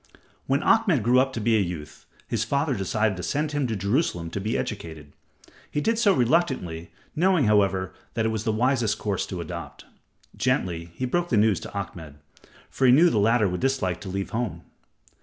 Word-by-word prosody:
When 135 +2 +1
Ahmed 175 - +3
grew 125 +3 +4
up 135 +1 +2
to 115 - -3
be 115 +1 +2
a - - +4
youth, 85 -6 -5 0.2
his - - -1
father 140 +1 0
decided 105 0 0
to - - -5
send 150 +9 -1
him 145 -3 0
to 115 - -2
Jerusalem 100 - -1
to 100 - -4
be 110 +4 -1
educated. 80 -8 -6 0.6
He - - -2
did 225 +8 0
so 210 -4 +4
reluctantly, 125 - 0 0.3
knowing, 180 -3 +3
however, 95 -3 +2 0.2
that 115 - 0
it - - +2
was 110 -1 -2
the 110 - 0
wisest 120 -1 +1
course 100 -3 -2
to 90 -2 -5
adopt. 85 -2 -8 0.5
Gently 85 -2 -1
he 130 - -2
broke 175 +7 -1
the 115 - +2
news 105 -3 +3
to - - -9
Ahmed, 80 -6 -7 0.6
for 130 - +2
he - - +7
knew 165 +7 +6
the 110 - +2
latter 110 +1 +3
would 90 0 -3
dislike 125 -10 0
to 95 - -7
leave 95 +1 -4
home. 120 +1 -3
110 Hz, 195 wpm, -25 LUFS, 95-135 Hz, 0.6 s, he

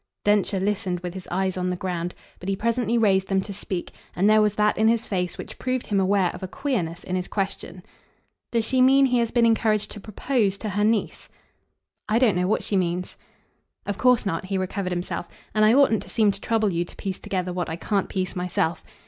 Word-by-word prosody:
Densher 205 -1 +2
listened 190 -2 -1
with 180 -1 -5
his 185 -1 -8
eyes 190 +1 -1
on 180 0 -1
the 180 - -1
ground, 180 -1 -3 0.2
but 185 - -5
he 195 - +1
presently 230 +2 0
raised 195 -4 +3
them 195 -1 +1
to 200 +1 -7
speak, 185 -2 -4 0.2
and 190 +3 +2
there 215 0 +6
was 210 -1 +2
that 210 0 +2
in 220 - +3
his 230 0 +2
face 180 -3 -2
which - - -9
proved 255 -1 -1
him 200 -2 +1
aware 190 -1 +2
of - - -9
a 190 - -4
queerness 180 - -3
in 185 - -3
his 180 -1 -2
question. 190 -3 -4 0.7
"Does 230 -2 +1
she 260 +2 +2
mean 270 +2 +6
he 250 -2 +2
has 235 -1 +1
been 240 -1 +3
encouraged 220 -2 +2
to 210 - -7
PROPOSE 215 0 -1
to 215 - -4
her 205 +1 0
niece?" 220 0 0 0.8
"I 215 - +3
don't 235 -5 +4
know 180 0 +1
what 215 - +1
she 205 - -1
means." 180 -1 -1 0.7
"Of 205 0 -3
course 250 -3 +4
not" 185 -2 -2
he 195 0 -2
recovered 185 0 -2
himself; 175 0 -3 0.2
"and 215 - +3
I 215 - +6
oughtn't 270 -6 +4
to - - -10
seem 215 -3 +3
to 200 0 -7
trouble 220 -3 +1
you 170 0 0
to 175 - -13
piece 190 -2 -4
together 185 -1 -3
what 180 -1 -2
I 160 - -3
can't 200 +3 -1
piece 185 -1 -2
myself. 180 -2 -1
200 Hz, 225 wpm, -24 LUFS, 180-220 Hz, 0.8 s, there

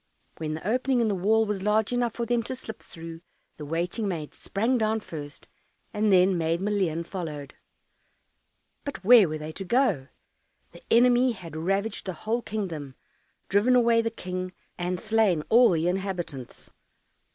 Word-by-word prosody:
When 155 -1 -3
the 160 - -6
opening 255 +3 +1
in 230 -2 +2
the - - +1
wall 215 +4 +2
was 205 -2 -2
large 210 +3 +1
enough 240 -2 0
for 235 - -2
them 240 0 +1
to 260 - -2
slip 220 -4 -9
through, 165 0 -9 0.4
the 150 - -7
waiting 175 +8 -2
maid 160 -6 -4
sprang 235 +5 -1
down 220 0 +1
first, 145 -6 -9 0.5
and 210 -1 +2
then 185 -1 +4
Maid 165 +1 0
Maleen 190 -5 0
followed. 150 -7 -6 1.3
But 280 -10 -6
where 220 -4 +7
were 155 - -3
they 155 +1 -6
to 195 - -6
go? 195 - +1 0.6
The - - -14
enemy 245 +1 +5
had 170 -7 -10
ravaged 195 +7 -1
the 185 - -2
whole 220 +8 -2
kingdom, 165 - -5 0.5
driven 210 +6 +3
away 235 -1 +4
the 230 - -1
King, 185 -3 -5 0.2
and 180 0 -2
slain 215 -7 +2
all 240 +2 +7
the 165 -1 +1
inhabitants. 180 -8 -4
195 Hz, 165 wpm, -26 LUFS, 165-225 Hz, 1.3 s, where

